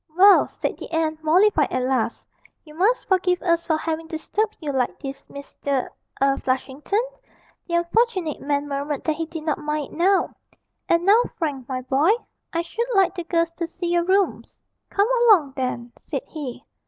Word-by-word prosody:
'Well,' 395 +2 +7
said - - -4
the - - -8
aunt, 315 -1 -1
mollified 330 -1 +4
at 255 - 0
last, 255 -3 -1 0.4
'you 305 - -14
must 405 +10 +1
forgive 360 -1 +2
us 335 -1 +2
for 315 -2 +1
having 325 0 -3
disturbed 420 +7 -2
you 300 -3 -3
like 255 -2 0
this, 275 -1 -8
Mr. 280 -1 -3 0.3
a 275 0 +2
Flushington' 270 - -1 0.6
(the 340 - -1
unfortunate 350 - +1
man 285 0 -1
murmured 280 0 -3
that 310 - 0
he 325 -1 -3
did 325 -1 -7
not 310 -2 -1
mind 300 -1 -3
it - - -10
now); 380 +3 +2 0.6
'and 335 +1 +3
now, 420 +4 +6 0.2
Frank, 280 -6 -3
my 255 -1 -2
boy, 270 +6 +2 0.4
I 335 0 -1
should 460 +8 -3
like 385 -2 +4
the 350 -2 -5
girls 335 -1 +1
to 335 0 -4
see 345 +1 -4
your 345 0 +3
rooms.' 385 +1 0 0.3
'Come 405 +1 +2 0.2
along 335 - +5
then,' 250 -2 -3
said - - -5
he. 285 -6 -7
320 Hz, 180 wpm, -23 LUFS, 280-360 Hz, 0.6 s, Well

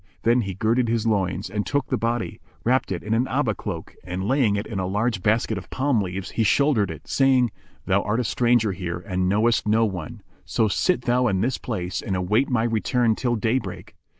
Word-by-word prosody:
Then 120 +2 +4
he 95 -4 -4
girded 115 +5 +1
his 115 0 0
loins 100 -2 0
and 105 -1 -2
took 145 +3 -1
the - - 0
body, 115 0 -2 0.2
wrapped 130 -1 +1
it 90 - -3
in 105 - -1
an 120 +3 +2
Abá 130 -5 0
cloak 85 -6 -6
and, 90 +2 -4
laying 125 -5 +2
it 100 - -2
in 100 - -4
a 95 - -1
large 105 +1 0
basket 110 0 +1
of 95 - -13
palm 135 -4 +1
leaves, 95 0 -4
he - - -1
shouldered 120 -1 +3
it - - -9
saying, 130 -4 +3 0.3
"Thou 95 +1 +2
art 105 +4 -1
a - - +1
stranger 120 -2 +2
here 90 -2 -4
and 90 -1 0
knowest 110 +3 +2
no 110 +2 +4
one: 90 -7 -5 0.2
so 110 - +1
sit 150 - +1
thou 125 +1 +2
in 95 -4 +1
this 125 +4 0
place 95 -5 -3
and 95 - -2
await 105 +8 +1
my 125 -3 +1
return 115 +1 +1
till 120 0 0
day 115 +4 +1
break. 95 -7 -9
110 Hz, 215 wpm, -24 LUFS, 95-120 Hz, 0.3 s, Then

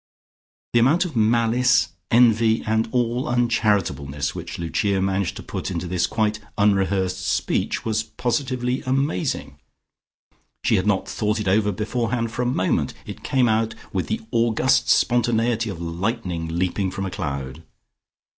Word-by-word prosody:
The 120 - +5
amount 155 +10 +4
of 165 -6 -6
malice, 120 +3 +3 0.2
envy 115 -1 +4
and 110 +1 +1
all 120 0 0
uncharitableness 105 - 0
which - - -6
Lucia 95 +4 0
managed 95 -1 0
to - - -8
put - - -5
into 90 -1 -3
this 90 0 0
quite 105 +2 0 0.2
unrehearsed 95 -2 +1
speech - - -1
was 110 -1 +1
positively 125 +2 -2
amazing. 90 - -1 1.0
She - - +3
had 95 - 0
not 100 -2 +1
thought 105 0 -1
it 105 - -3
over 105 +2 +3
beforehand 115 +3 -2
for 120 - -3
a 125 - 0
moment; 95 -7 0
it - - -8
came 130 -2 +2
out 110 0 +1 0.2
with 95 -2 -1
the 110 - -2
august 120 +3 +2
spontaneity 115 -1 +2
of 95 -5 -6
lightning 85 0 -3
leaping 90 +3 -1
from 95 +1 -4
a 95 - -4
cloud. 70 -6 -4
110 Hz, 145 wpm, -23 LUFS, 95-120 Hz, 1.0 s, The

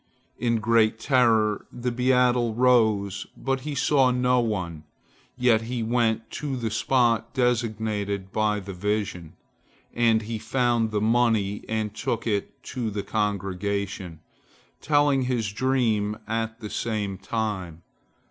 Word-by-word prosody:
In 115 -1 +1
great 110 0 +2
terror 115 -6 +2
the 125 0 -3
beadle 125 -2 +2
arose, 110 -6 +2
but 135 0 -1
he 145 +2 -5
saw 135 -1 +3
no 125 0 +2
one, 90 -9 -2 0.5
yet 120 -3 +3
he 115 0 -3
went 115 -1 0
to 140 -3 -3
the 115 -3 -3
spot 115 +1 +1
designated 110 -5 -1
by 105 0 +1
the 95 0 -7
vision, 95 -3 -3 0.6
and 115 -2 +3
he 110 +1 -4
found 120 -2 +1
the 105 -1 -1
money 110 -3 +2
and 110 -2 -2
took 115 +1 -3
it 105 -3 -2
to 120 -4 -3
the 100 -1 -4
congregation, 100 -4 -2 0.6
telling 145 -3 +3
his 115 -5 -1
dream 110 -4 +1
at 115 +1 -3
the 105 - -6
same 105 -4 -2
time. 95 -6 -3
110 Hz, 130 wpm, -25 LUFS, 105-125 Hz, 0.6 s, saw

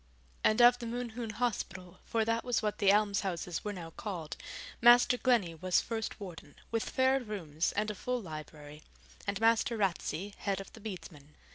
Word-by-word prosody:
And 215 +3 +5
of 245 0 +7
the 235 - -5
Mohune 235 -1 -4
Hospital 200 -6 -3
for 225 -1 0
that 230 +1 0
was 245 -3 0
what 210 -1 -1
the 200 -2 +6
alms 205 -1 +3
houses 175 -3 -3
were 210 - -2
now 170 -4 -7
called 170 -5 -5 0.5
Master 240 +1 +7
Glennie 235 -9 +2
was 180 +3 +2
first 225 -1 -4
warden, 175 -7 -9 0.2
with 225 -1 -1
fair 260 +1 +3
rooms 180 - -2
and 210 +1 0
a - - -5
full 250 +5 -2
library, 155 -4 -9 0.5
and 200 0 -1
Master 230 +1 +3
Ratsey 195 -1 -1
head 195 -1 -1
of 195 - -9
the - - -12
Bedesmen. 170 -8 -9
210 Hz, 175 wpm, -32 LUFS, 175-230 Hz, 0.5 s, of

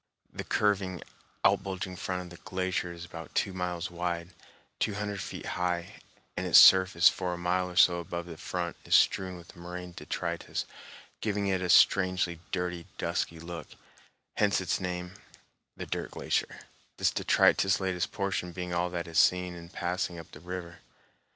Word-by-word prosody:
The - - -5
curving, 95 -4 0 0.4
out - - +5
bulging 95 -1 -5
front 90 0 -3
of 90 - -11
the 85 - -13
glacier 95 -2 -2
is 85 0 -8
about 80 -1 -10
two 95 - +1
miles 90 -1 -3
wide, 85 0 -3 0.5
two 105 - 0
hundred 105 -1 -3
feet - - -6
high, 90 -1 -2 0.3
and - - -2
its - - +7
surface 95 -2 +8
for 90 -1 +1
a - - -8
mile 90 +1 0
or 90 - -10
so 85 -1 +6
above 85 0 -5
the 85 -2 -8
front 85 +1 -4
is - - +3
strewn 95 -1 +3
with 85 +2 -14
moraine 90 +1 -7
detritus, 85 -1 -3 0.5
giving 105 -2 -1
it 95 -1 +1
a 90 - -2
strangely 90 -1 +4
dirty, 90 -2 -3
dusky 85 - -2
look, 85 0 -7 0.7
hence 105 -1 +3
its 95 - -1
name, 90 -1 -4 0.6
the - - -5
"Dirt - - -3
Glacier," - - -2 0.4
this - - +2
detritus 95 0 +3
laden 95 -2 -2
portion 95 -3 -2
being 90 0 -5
all 90 +1 +1
that 85 -1 -4
is 85 - +1
seen 90 -1 +3
in 85 -1 -10
passing 90 0 -2
up 80 - -10
the - - -11
river. 85 0 -7
90 Hz, 170 wpm, -29 LUFS, 85-95 Hz, 0.7 s, surface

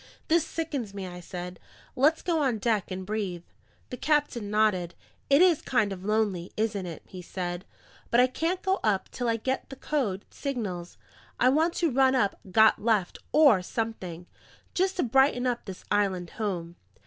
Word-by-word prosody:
"This 330 0 +4
sickens 280 -11 -4
me," 195 -1 -4
I 180 -1 -8
said. 180 +1 -7 0.4
"Let's 300 +5 +3
go 335 -3 +1
on 260 -5 +1
deck 215 -2 0
and 185 0 -5
breathe." 195 -4 -3 0.5
The 250 - -4
captain 290 -7 0
nodded. 205 -5 +1 0.3
"It 280 +5 +6
IS 350 -5 +4
kind 215 -6 +1
of 185 -1 -9
lonely, 205 -4 0
isn't 210 -4 -1
it?" 165 - -8
he 185 - -9
said. 175 0 -5 0.4
"But 235 - +3
I 250 - +7
can't 330 +8 -2
go 385 0 +1
up 200 -3 +1
till 245 -2 -2
I 230 - +2
get 260 +5 -2
the 270 - -8
code 245 -10 -2
signals. 205 -11 -4 0.4
I 250 - +5
want 320 +5 +2
to 335 -4 +1
run 265 +1 +4
up 205 -6 +1
'Got 220 +3 +5
Left' 210 -5 +1
or 285 -11 +6
something, 180 -5 -4 0.5
just 375 +1 +1
to 355 - 0
brighten 255 0 +3
up 245 -2 -1
this 190 -2 -8
island 190 -4 +1
home. 175 -6 -4
220 Hz, 175 wpm, -27 LUFS, 185-270 Hz, 0.5 s, I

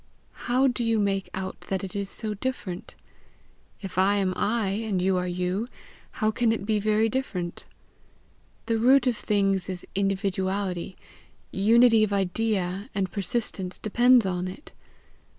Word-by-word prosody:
"How 255 +2 +4
do 245 -2 +1
you 230 -1 +2
make 195 -1 0
out 190 0 -5
that 190 0 -1
it 190 0 -6
is 200 -1 -3
so 215 +1 -3
different? 205 -5 -5 0.9
If 190 -2 -4
I 195 +2 +4
am 190 -2 +1
I, 215 -2 0
and 205 -1 -1
you 185 +1 +2
are 180 0 -1
you, 180 +5 -2 0.5
how 215 -2 +1
can 235 0 +1
it 220 -3 -2
be 215 -1 +1
very 215 +1 +2
different? 195 -8 -3 1.0
The 225 -1 0
root 260 +3 +5
of 250 -2 +2
things 195 -3 0
is 180 -1 -5
individuality, 195 -2 -1 0.5
unity 225 +2 +5
of 210 - 0
idea, 195 0 -1
and 190 -2 -1
persistence 200 -3 -2
depends 240 +2 +4
on 180 -1 -1
it. 185 - -10
200 Hz, 150 wpm, -26 LUFS, 190-225 Hz, 1.0 s, root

